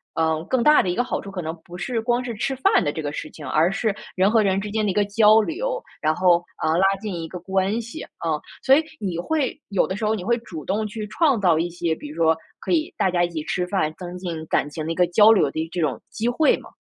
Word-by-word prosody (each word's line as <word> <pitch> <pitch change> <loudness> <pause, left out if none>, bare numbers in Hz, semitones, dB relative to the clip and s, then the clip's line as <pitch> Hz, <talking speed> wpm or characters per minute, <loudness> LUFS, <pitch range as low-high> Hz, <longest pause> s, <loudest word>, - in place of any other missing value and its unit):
呃， 160 -1 +1
更 240 +4 +1
大 300 +3 +6
的 185 - -1
一 175 - -1
个 245 - +1
好 - - -2
处， 200 - -9
可 190 -2 -4
能 160 0 -4
不 175 - -10
是 235 +5 -2
光 240 +2 0
是 245 -1 -4
吃 270 +6 -2
饭 260 - +3
的 145 - 0
这 160 - -5
个 145 -1 -3
事 155 - -5
情， 150 - -10
而 160 +6 +2
是 215 +1 0 0.2
人 190 +1 +3
和 225 -1 +4
人 195 -2 +2
之 210 - -5
间 215 0 0
的 200 - +1
一 - - -3
个 205 - +3
交 215 +1 +5
流， 480 - -3 0.2
然 155 +1 +2
后， 175 -2 +3 0.2
呃， 160 +1 +2
拉 185 - +3 0.2
近 210 -3 -4
一 165 - -5
个 180 - -7
关 190 +4 0
系， 235 +7 -8
啊。 160 -2 -3 0.2
所 270 - +6
以 310 - +3 0.2
你 185 -5 -3
会 285 - -1
有 200 -3 +2
的 190 - -3
时 215 - -3
候 215 - +2
你 195 - -5
会 235 +4 +1
主 170 -10 -9
动 210 +3 -1
去 210 0 -6
创 275 +1 +2
造 175 -5 +3
一 170 +1 -1
些， 170 -1 -2
比 150 - -9
如 150 - -9
说 160 -1 +3 0.2
可 - - -5
以 320 -2 +1
大 - - +2
家 175 -1 +2
一 175 - 0
起 160 -3 -4
吃 180 +3 -1
饭， 180 -5 0
增 180 -1 -7
进 170 -3 -5
感 145 - +1
情 155 +1 -5
的 165 - -2
一 - - -2
个 180 0 +3
交 210 +5 +6
流 190 -10 +4
的 160 +2 -3
这 175 - -2
种 150 -4 -1
机 225 - -3
会 295 +5 +3
吗？ - - -13
190 Hz, 305 characters per minute, -23 LUFS, 165-225 Hz, 0.2 s, 大